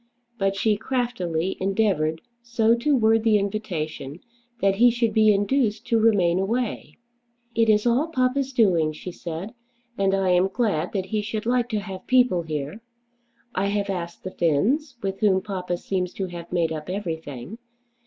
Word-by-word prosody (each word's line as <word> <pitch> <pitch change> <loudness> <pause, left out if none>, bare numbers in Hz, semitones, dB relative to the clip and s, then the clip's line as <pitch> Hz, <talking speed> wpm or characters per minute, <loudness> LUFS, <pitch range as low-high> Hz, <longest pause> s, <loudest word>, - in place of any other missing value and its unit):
But 195 0 +1
she 210 +1 +1
craftily 190 -8 -2
endeavoured 190 -6 +1 0.2
so 235 -1 +2
to 280 +5 +1
word 225 -2 +3
the 220 -2 +4
invitation 175 -8 -4 0.4
that 195 -2 +2
he 245 +3 +7
should 235 -2 0
be 215 -1 +5
induced 215 +2 +1
to 230 - +3
remain 190 -6 +3
away. 230 +5 -2 0.6
"It 230 -1 +2
is 210 +1 +4
all 245 +6 +2
papa's 265 -2 0
doing," 180 - +3
she 180 +4 -7
said; 170 +5 -6 0.5
"and 195 0 +2
I 195 -1 +1
am 180 +1 +4
glad 195 -7 -1
that 190 -3 -1
he 210 +2 -1
should 215 +1 -4
like 245 0 +1
to 215 -3 -1
have 190 -2 -8
people 250 -9 +4
here. 155 +5 -5 0.7
I 195 +2 0
have 200 0 -1
asked 170 -2 -5
the 185 - -5
Finns, 240 - +1
with 195 0 -3
whom 200 -4 +3
papa 185 -3 -4
seems 180 0 -3
to 195 - -2
have 175 -2 -8
made 170 -2 +1
up 155 +1 -5
everything. 165 - -5
200 Hz, 165 wpm, -24 LUFS, 180-225 Hz, 0.7 s, he